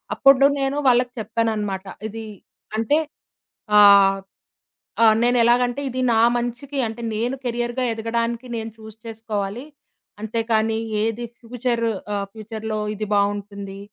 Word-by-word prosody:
అప్పుడు 275 Hz, 0 st, +6 dB
నేను 270 Hz, +1 st, -1 dB
వాళ్ళకి 250 Hz, 0 st, +3 dB
చెప్పాననమాట. 215 Hz, -3 st, -2 dB, 0.2 s
ఇది 225 Hz, +1 st, -7 dB, 0.5 s
అంటే, 225 Hz, +7 st, +2 dB, 0.8 s
ఆహ్, 200 Hz, -1 st, +7 dB, 0.8 s
ఆహ్, 220 Hz, -1 st, +6 dB
నేను 245 Hz, +1 st, +3 dB
ఎలాగంటే 245 Hz, +3 st, +2 dB
ఇది 255 Hz, +1 st, -3 dB
నా 225 Hz, -, +3 dB, 0.2 s
మంచికి 250 Hz, +4 st, -4 dB
అంటే 225 Hz, +2 st, -7 dB
నేను 240 Hz, +4 st, -1 dB
కెరియర్‌గా 240 Hz, +1 st, -2 dB
ఎదగడానికి 230 Hz, +2 st, -2 dB
నేను 225 Hz, 0 st, -5 dB
చూజ్ 220 Hz, -1 st, -12 dB
చేసుకోవాలి. 220 Hz, +1 st, -4 dB, 0.6 s
అంతే 225 Hz, +1 st, -2 dB
కానీ, 220 Hz, 0 st, +2 dB, 0.3 s
ఏది 225 Hz, +2 st, -2 dB
ఫ్యూచర్ 240 Hz, 0 st, -2 dB, 0.3 s
ఆహ్, 200 Hz, -1 st, -1 dB
ఫ్యూచర్‌లో 220 Hz, 0 st, -5 dB, 0.2 s
ఇది 215 Hz, +1 st, -3 dB
బావుంటుంది, 200 Hz, -1 st, -2 dB
225 Hz, 120 wpm, -22 LUFS, 215-240 Hz, 0.8 s, ఆహ్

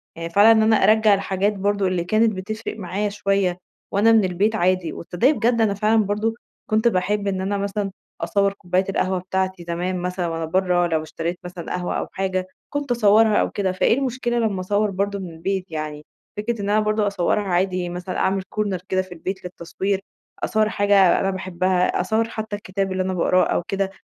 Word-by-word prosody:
يعني 165 Hz, 0 st, -5 dB
فعلًا 205 Hz, +6 st, +6 dB
إن 220 Hz, -1 st, +5 dB
أنا 220 Hz, 0 st, +4 dB
أرجّع 215 Hz, -1 st, +5 dB
الحاجات 195 Hz, +1 st, 0 dB
برضه 200 Hz, 0 st, 0 dB
اللي 180 Hz, -2 st, 0 dB
كانت 220 Hz, +5 st, +2 dB
بتفرق 215 Hz, +3 st, -5 dB
معايا 205 Hz, +1 st, -2 dB
شوية 195 Hz, -3 st, 0 dB, 0.3 s
وأنا 205 Hz, +3 st, +4 dB
من 225 Hz, -2 st, +5 dB
البيت 190 Hz, +4 st, +1 dB
عادي، 185 Hz, -3 st, +1 dB
وتصدقي 180 Hz, -, +1 dB
بجد 235 Hz, -3 st, +1 dB
أنا 215 Hz, -2 st, +3 dB
فعلًا 215 Hz, +2 st, +2 dB
برضه 210 Hz, +3 st, -1 dB, 0.4 s
كنت 220 Hz, +1 st, +3 dB
باحب 205 Hz, 0 st, 0 dB
إن 190 Hz, -1 st, -1 dB
أنا 200 Hz, +2 st, -1 dB
مثلًا 200 Hz, 0 st, -2 dB, 0.3 s
أصور 200 Hz, -1 st, +1 dB
كوباية 185 Hz, -1 st, -1 dB
القهوة 190 Hz, -1 st, 0 dB
بتاعتي 185 Hz, 0 st, -2 dB
زمان 180 Hz, +2 st, -2 dB
مثلًا 180 Hz, 0 st, -2 dB
وأنا 165 Hz, 0 st, -3 dB
برا 180 Hz, +1 st, +1 dB
لو 160 Hz, -2 st, 0 dB
اشتريت 165 Hz, +2 st, -4 dB
مثلًا 180 Hz, -1 st, -6 dB
قهوة 180 Hz, 0 st, -3 dB
أو -, -, -3 dB
حاجة، 185 Hz, -1 st, -2 dB, 0.2 s
كنت 285 Hz, -2 st, -3 dB
أصورها 220 Hz, -1 st, +4 dB
أو -, -, +2 dB
كده، 195 Hz, -2 st, -1 dB
فإيه 185 Hz, +5 st, +2 dB
المشكلة 250 Hz, -3 st, -1 dB
لما 215 Hz, -5 st, 0 dB
أصور 205 Hz, +3 st, 0 dB
برضه 200 Hz, +1 st, -2 dB
من 185 Hz, -2 st, -6 dB
البيت، 185 Hz, +3 st, -3 dB
يعني 155 Hz, -1 st, -5 dB, 0.3 s
فكرة 215 Hz, +1 st, -2 dB
إن 200 Hz, -, -2 dB
أنا 210 Hz, +1 st, +3 dB
برضه 215 Hz, 0 st, +1 dB
أصورها 200 Hz, +1 st, +1 dB
عادي 185 Hz, -1 st, 0 dB
مثلًا 180 Hz, +1 st, -5 dB
أعمل 195 Hz, 0 st, +1 dB
corner 205 Hz, -3 st, -1 dB
كده 185 Hz, 0 st, +2 dB
في 185 Hz, -1 st, -12 dB
البيت 185 Hz, +3 st, -5 dB
للتصوير، 190 Hz, +2 st, -3 dB, 0.4 s
أصور 215 Hz, 0 st, +2 dB
حاجة 200 Hz, -3 st, +4 dB
أنا 195 Hz, -, 0 dB
باحبها، 185 Hz, -1 st, 0 dB
أصور 225 Hz, +1 st, 0 dB
حتى 220 Hz, -2 st, -4 dB
الكتاب 195 Hz, -1 st, -3 dB
اللي 185 Hz, 0 st, 0 dB
أنا 185 Hz, 0 st, -2 dB
بقراه 185 Hz, +1 st, +3 dB
أو -, -, 0 dB
كده، 195 Hz, +2 st, -2 dB
195 Hz, 190 wpm, -22 LUFS, 185-210 Hz, 0.4 s, فعلًا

